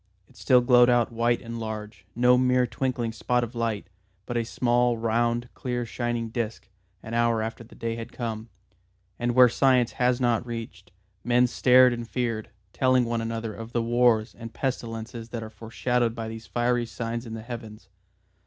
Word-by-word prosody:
It - - -24
still 125 -2 +4
glowed 120 0 +6
out 120 -2 +3
white 115 +1 0
and 115 0 -6
large, 110 -3 -7
no 125 +1 +5
mere 125 0 +3
twinkling 125 -2 -2
spot 120 +2 0
of 120 +1 -5
light, 115 -3 -2 0.4
but 120 - -5
a 120 - +1
small 120 0 +1
round 115 +1 0
clear 125 -1 -3
shining 120 0 -3
disc, 110 -4 -4 0.4
an 110 - -7
hour 115 -1 +2
after 115 +1 -5
the 115 - -16
day 115 -1 -3
had 115 +1 -7
come. 115 -2 -5 0.7
And 120 0 -1
where 125 -1 +8
science 125 0 +3
has 125 0 +1
not 120 -3 +1
reached, 115 -7 -8 0.3
men 120 +1 +4
stared 125 +1 +5
and 120 -1 -6
feared, 115 -4 -2 0.2
telling 130 -1 +3
one 115 0 -1
another 115 -1 -4
of 115 +3 -9
the 120 - +1
wars 120 -1 +2
and 115 -1 -9
pestilences 115 -2 -4
that 115 -1 -5
are 110 - -9
foreshadowed 115 +1 -1
by 115 -1 -4
these 115 -1 -9
fiery 120 0 0
signs 115 +1 -4
in 110 - -6
the 110 - -7
Heavens. 110 -4 -9
120 Hz, 180 wpm, -26 LUFS, 115-125 Hz, 0.7 s, where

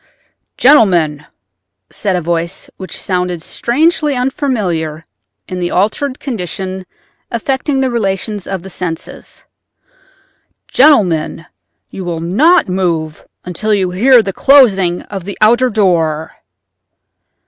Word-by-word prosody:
"Gentlemen," 175 - +3 0.6
said 195 -3 -2
a 180 - -1
voice 170 +2 -3
which 185 - -7
sounded 180 -3 -2
strangely 300 - 0
unfamiliar 200 - -2 0.4
in 185 - -5
the 175 -1 -1
altered 220 +9 -1
condition 190 - -5 0.4
affecting 265 +4 -1
the 260 -1 0
relations 205 -2 -2
of 190 -3 -4
the 190 - -9
senses—"gentlemen, 180 - -2 0.5
you 190 - -7
will 170 -2 -3
not 285 - +3
move 170 -4 -2 0.2
until 210 +5 -1
you 185 -3 -1
hear 240 +6 +5
the 195 -1 -4
closing 195 -12 +4
of 195 -4 -7
the 200 - -6
outer 240 +4 +4
door." 165 -7 0
190 Hz, 105 wpm, -14 LUFS, 175-245 Hz, 0.6 s, hear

